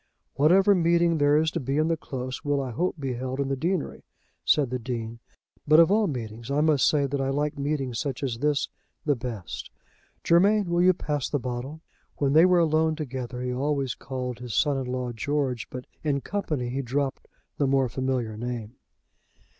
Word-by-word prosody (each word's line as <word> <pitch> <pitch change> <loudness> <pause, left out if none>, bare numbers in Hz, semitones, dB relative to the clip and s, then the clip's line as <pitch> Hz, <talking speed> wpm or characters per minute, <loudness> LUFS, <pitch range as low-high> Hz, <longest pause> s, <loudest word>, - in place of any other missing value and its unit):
"Whatever 190 +8 +5
meeting 170 -2 +3
there 145 +1 +4
is 160 +1 +2
to 170 - -2
be 135 0 -2
in 155 +1 +2
the 165 - +2
Close, 130 -4 -6
will, 145 -1 +1
I 130 -2 -3
hope, 175 +10 -1
be 135 -3 -2
held 130 +2 -4
in 140 -1 0
the 135 - 0
deanery," 170 +4 -2 0.4
said 140 -5 +3
the 125 - -1
Dean; 115 -1 -5 0.5
"but 155 +2 +7
of 170 +2 +6
all 210 0 +3
meetings, 115 -3 -5
I 140 +1 +1
must 150 -3 +4
say 145 -2 +2
that 140 0 -2
I 135 - 0
like 145 +2 -1
meetings 140 -4 -2
such 140 -3 -3
as 120 -4 -2
this, 145 0 +1 0.4
the 145 -2 +3
best. 115 -10 -6 0.5
Germain, 200 +4 +4
will 175 0 +3
you 185 +1 +6
pass 150 -5 -2
the 145 - 0
bottle?" 130 +4 -5 0.4
When 140 -1 +1
they 160 +4 +7
were 180 -1 +4
alone 160 -1 +3
together 130 -4 -5
he 125 0 -2
always 135 -1 -1
called 125 -2 -5
his 125 -4 -5
son 145 +5 +3
in 135 -1 -3
law, 125 -1 -2
George; 130 0 -2
but 125 0 -7 0.2
in 140 -3 0
company 150 -11 -2
he 135 +3 -2
dropped 135 +2 -2 0.3
the 140 - +3
more 135 -1 +3
familiar 125 -3 -2
name. 120 0 -5
140 Hz, 195 wpm, -26 LUFS, 125-155 Hz, 0.5 s, but